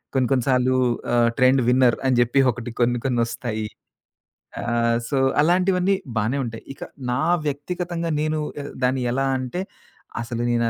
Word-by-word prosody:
కొన్ని 130 -2 +2
కొన్ని 130 -3 +2
సార్లు 130 0 +3 0.4
ఆహ్, 120 -1 +4
ట్రెండ్ 130 +1 +4
విన్నర్ 125 -1 +4
అని 130 -1 +3
జెప్పి 120 +3 +3
ఒకటి 120 0 -7
కొన్ని 120 0 +2
కొన్ని 125 -2 +1
ఒస్తాయి. 115 -2 -4 1.0
ఆహ్, 115 0 +1
సో 140 - 0 0.2
అలాంటివన్నీ 180 +3 +3 0.2
బానే 115 +6 0
ఉంటాయి. 115 -1 -7
ఇక - - -18 0.3
నా 125 +2 0 0.3
వ్యక్తిగతంగా 170 +3 -3
నేను 155 0 0 0.2
ఎ - - -8 0.2
దాన్ని 130 0 +1
ఎలా 135 +1 0
అంటే 130 +8 -4 0.6
అసలు 120 0 -4
నేను 120 -1 +1
125 Hz, 150 wpm, -23 LUFS, 120-145 Hz, 1.0 s, ఆహ్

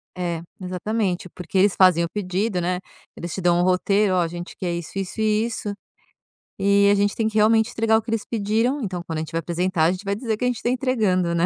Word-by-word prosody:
É, 175 -2 -3 0.2
exatamente 185 0 -2
porque 180 +2 -5
eles 195 +1 +4
fazem 180 -3 +5
o 170 - -2
pedido, 190 +1 -2
né, 180 +1 -1 0.4
eles 170 -1 -6
te 190 - -4
dão 175 -1 +3
um - - +3
roteiro, 190 +2 +2
"Oh - - +2
a 170 - +1
gente 175 +1 -8
quer 175 -2 -2
isso 170 -1 -6
isso 195 +2 -4
e 215 0 +2
isso" 220 -3 -4 0.9
e 200 +1 +4
a - - +4
gente 205 0 +1
tem 225 - 0
que 220 - -5
realmente 220 +2 +4
entregar 225 -1 +2
o - - 0
que 225 - -11
eles 225 -2 -1
pediram 225 +5 0
então 185 -6 -4
quando 160 -2 -5
a - - -1
gente 160 - -6
vai 165 - -1
apresentar 170 0 0
a 165 - +4
gente 185 +2 -6
vai 200 0 0
dizer 220 0 -2
que 250 - -5
a - - +3
gente 245 -2 -2
tá - - +1
entregando, 220 -9 +1
né. 170 0 +2
195 Hz, 250 wpm, -23 LUFS, 175-220 Hz, 0.9 s, fazem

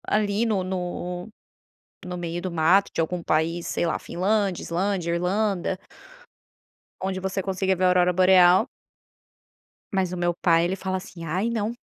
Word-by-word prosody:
Ali 210 +1 +1
no 210 -5 0
no 180 0 -4 0.8
no 180 0 -5
meio 175 0 -4
do 185 - -3
mato 170 +5 +3
de - - 0
algum 170 +2 -2
país, 165 +2 0
sei - - -1
lá, 165 - -1
Finlândia, 195 0 -1
Islândia, 175 0 -1
Irlanda. 190 +1 0 1.2
Onde 190 0 -2
você 190 +1 -2
consiga 190 0 0
ver 185 - -2
a - - +6
Aurora 180 0 +3
Boreal. 185 +3 +5 1.3
Mas 185 -2 0
o - - -4
meu 175 0 +1
pai, 165 -1 +3
ele 185 +2 -1
fala 190 0 -2
assim: 175 -2 -9
"Ai 185 +8 -1
não, 225 -1 -1
185 Hz, 155 wpm, -25 LUFS, 175-195 Hz, 1.3 s, a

